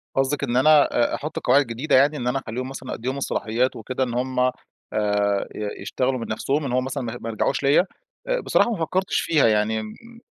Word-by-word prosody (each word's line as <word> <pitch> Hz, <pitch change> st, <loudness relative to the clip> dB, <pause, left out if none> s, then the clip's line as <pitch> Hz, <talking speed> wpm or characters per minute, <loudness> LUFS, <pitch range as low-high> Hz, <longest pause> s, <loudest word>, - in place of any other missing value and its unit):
قصدِك 135 Hz, +2 st, 0 dB
إن 120 Hz, -, 0 dB
أنا 150 Hz, +2 st, +6 dB, 0.3 s
آآ -, -, 0 dB
أحط 150 Hz, +2 st, -5 dB
قواعد 140 Hz, +1 st, +4 dB
جديدة 120 Hz, +7 st, 0 dB
يعني، 145 Hz, +3 st, +4 dB
إن 125 Hz, -, -3 dB
أنا 130 Hz, +2 st, +1 dB
أخلِّيهم 130 Hz, +1 st, -5 dB
مثلًا 135 Hz, -1 st, -7 dB
أدّيهم 130 Hz, +4 st, -3 dB
الصلاحيات 125 Hz, -1 st, -1 dB
وكده 130 Hz, +4 st, -3 dB
إن 120 Hz, -2 st, -3 dB
هم 125 Hz, +1 st, -1 dB
آآ 125 Hz, 0 st, +3 dB, 1.0 s
ي 105 Hz, -1 st, -5 dB
يشتغلوا 130 Hz, 0 st, -1 dB
من 115 Hz, -, -5 dB
نفْسهم 140 Hz, +7 st, -1 dB
إن 130 Hz, -, -3 dB
هو 130 Hz, -, +2 dB
مثلًا 130 Hz, 0 st, -4 dB
ما 120 Hz, 0 st, -5 dB
ما 115 Hz, -, -4 dB
يرْجَعوش 120 Hz, +5 st, -1 dB
ليَّ؟ 140 Hz, +1 st, +5 dB
آآ -, -, -4 dB
بصراحة 240 Hz, -, +2 dB
ما 220 Hz, -, -2 dB
فكرتش 185 Hz, +3 st, 0 dB
فيها 155 Hz, -6 st, +3 dB
يعني، 110 Hz, 0 st, +2 dB
إمم 230 Hz, -, -10 dB
130 Hz, 210 wpm, -23 LUFS, 120-145 Hz, 1.0 s, أنا